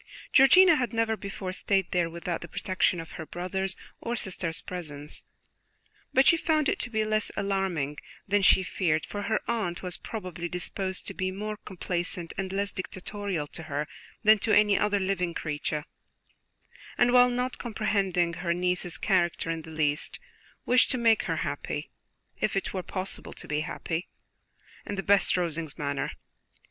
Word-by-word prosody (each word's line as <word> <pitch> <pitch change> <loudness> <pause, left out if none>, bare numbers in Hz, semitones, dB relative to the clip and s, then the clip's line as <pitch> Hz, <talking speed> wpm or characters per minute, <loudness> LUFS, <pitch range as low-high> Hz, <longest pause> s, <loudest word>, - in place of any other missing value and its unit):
Georgiana 330 +5 +8
had 245 -2 -1
never 225 -1 +1
before 195 -2 -5
stayed 195 -1 +1
there 175 -2 +2
without 170 0 -4
the 170 - -7
protection 185 0 +1
of 165 - -8
her 160 - -7
brother's 190 +2 -2 0.2
or 235 - -2
sister's 180 -6 -1
presence; 150 -5 -5 0.9
but 265 +1 +5
she 335 - +7
found 310 -2 +2
it - - +1
to 245 - -1
be 220 -2 0
less 215 0 +1
alarming 185 -8 -1 0.3
than 205 +1 +3
she 190 0 +6
feared, 165 -4 0
for 205 - -5
her 220 +1 +1
aunt 210 -7 -1
was 180 -1 -1
probably 180 -6 -5
disposed 185 +2 -3
to - - -4
be 185 0 -1
more 210 +3 -4
complaisant 175 -3 -4
and 190 -1 -3
less 200 +1 0
dictatorial 185 -2 -4
to 155 - -8
her 145 +1 -1 0.4
than 215 0 +7
to 220 - 0
any 210 -1 +5
other 205 0 +2
living 185 -3 -1
creature; 150 -1 -2 1.1
and 245 0 +4
while 250 0 +7
not 250 +1 -2
comprehending 195 -6 0
her 170 0 -1
niece's 180 -1 -1
character 175 -4 +1
in 165 0 -3
the 160 - -11
least, 150 -2 -1 0.5
wished 250 +1 +5
to 255 - +1
make 230 -2 +4
her - - 0
happy, - - -4 0.5
if 210 - 0
it 195 - -1
were 190 - -1
possible 185 +1 -3
to - - -8
be 150 0 0
happy, 160 +2 -3 0.8
in - - -4
the 195 - -3
best 200 -2 +4
Rosings 165 -3 -2
manner. 140 -1 -1
185 Hz, 165 wpm, -28 LUFS, 170-210 Hz, 1.1 s, Georgiana